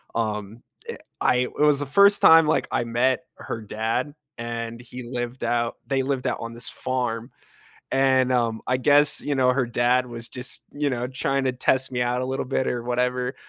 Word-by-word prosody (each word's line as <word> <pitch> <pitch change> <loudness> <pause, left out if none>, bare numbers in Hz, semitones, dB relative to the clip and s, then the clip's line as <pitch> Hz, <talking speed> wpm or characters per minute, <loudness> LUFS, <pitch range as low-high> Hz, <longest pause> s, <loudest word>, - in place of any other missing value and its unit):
um, 110 0 -3 0.2
eh, - - -5 0.2
I - - +3
it 125 0 -1
was 150 -1 +4
the - - -1
1st 200 +8 +5
time, 165 0 +8
like, 155 - +1
I 120 - 0
met 120 +2 +1
her - - -6
dad, 115 +6 -2 0.2
and 115 0 -5
he 125 +1 -9
lived 120 +1 -5
out 120 0 0
they 135 0 0
lived 135 -1 -2
out - - -1
on 115 0 -6
this 120 +1 -3
farm, 125 -2 -3 0.6
and, 130 -1 +3
um, 115 -3 0
I 125 - +2
guess, 145 +2 +4
you 145 - -2
know, 125 -1 +3
her 130 -2 +1
dad 120 +2 +1
was 120 -1 -9
just, 125 0 -7
you 145 0 -1
know, 125 -1 -2
trying 135 +1 -1
to 130 - +2
test 130 +1 +1
me 125 - -1
out, 125 +1 0
a - - -2
little 130 +1 -3
bit, 130 0 -1
or 120 -1 -2
whatever, 125 +1 -1
125 Hz, 200 wpm, -24 LUFS, 120-130 Hz, 0.6 s, time